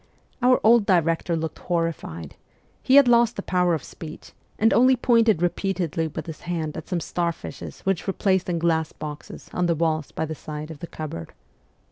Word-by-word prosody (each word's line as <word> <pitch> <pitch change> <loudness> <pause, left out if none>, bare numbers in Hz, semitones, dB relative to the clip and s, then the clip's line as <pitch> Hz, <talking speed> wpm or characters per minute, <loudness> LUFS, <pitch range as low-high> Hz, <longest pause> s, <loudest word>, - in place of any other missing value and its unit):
Our 250 +1 +5
old 225 -1 +5
director 170 -1 +2
looked 160 0 -4
horrified; 165 - -3 0.5
he 260 - +3
had 280 -2 +8
lost 235 -1 +4
the 200 - -5
power 180 -2 +2
of 155 - -6
speech, 155 -1 -10 0.3
and 225 +1 +3
only 255 +4 +5
pointed 230 -7 +3
repeatedly 175 -2 -1
with 155 - -6
his 160 -2 -8
hand 165 -3 -3
at 160 - -7
some 180 - 0
star 170 +1 -1
fishes - - -9
which 195 -1 -1
were 195 - 0
placed 190 -2 +1
in 175 - 0
glass 160 -1 +1
boxes 150 -1 -8
on 180 -1 +1
the 170 - +2
walls 155 -2 -1
by 160 - -2
the 155 - -5
sides 155 0 -7
of 155 - -10
the 170 - -7
cupboard. 145 - -7
170 Hz, 190 wpm, -24 LUFS, 160-195 Hz, 0.5 s, had